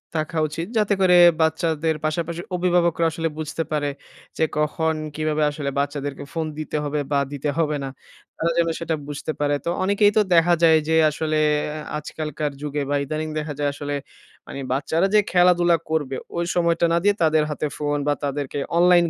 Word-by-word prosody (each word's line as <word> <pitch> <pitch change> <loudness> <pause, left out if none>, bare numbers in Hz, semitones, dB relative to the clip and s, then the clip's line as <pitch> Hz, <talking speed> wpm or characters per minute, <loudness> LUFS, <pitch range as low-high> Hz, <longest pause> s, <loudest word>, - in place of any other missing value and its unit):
থাকা 155 +1 -2
উচিত 165 +3 -5
যাতে 210 -1 +2
করে 180 -1 +5 0.3
বাচ্চাদের 160 0 +1
পাশাপাশি 165 +2 -2
অভিভাবকরা 175 -2 +2
আসলে 165 +1 -2
বুঝতে 160 +1 -3
পারে 145 -1 0 0.5
যে 160 - +3
কখন? 160 +1 +1 0.2
কীভাবে 155 0 0
আসলে 145 -2 -3
বাচ্চাদেরকে 145 -1 -3
ফোন 165 -1 -1
দিতে 155 0 -3
হবে? 150 0 -2
বা 140 - +3
দিতে 145 +1 -2
হবে 155 -2 +1
না? 135 - -4 0.5
তারা 165 +1 0
যেন 170 0 +3
সেটা 165 -1 -1
বুঝতে 145 +1 -4
পারে। 145 0 +1
তো - - 0
অনেকেই 205 +2 +4
তো - - +7
দেখা 170 +1 +5
যায় 160 -1 +7
যে 160 - +3
আসলে 155 +1 -1 0.6
আজকালকার 150 0 -4
যুগে 150 0 -2
বা 145 - +1
ইদানিং 155 +2 -3
দেখা 150 0 -4
যায় 145 -1 +1
আসলে 145 0 -4 0.5
মানে - - -7
বাচ্চারা 160 +7 +1
যে - - +8
খেলাধুলা 175 -1 +4
করবে 145 -4 -1 0.2
ঐ - - -3 0.2
সময়টা 170 -1 +2
না - - +4
দিয়ে 205 0 +3
তাদের 155 -1 +3
হাতে 150 0 -2
ফোন 145 0 -1
বা 145 - +3
তাদেরকে 145 0 -3 0.2
অনলাইন 175 0 +6
155 Hz, 175 wpm, -23 LUFS, 150-170 Hz, 0.6 s, যে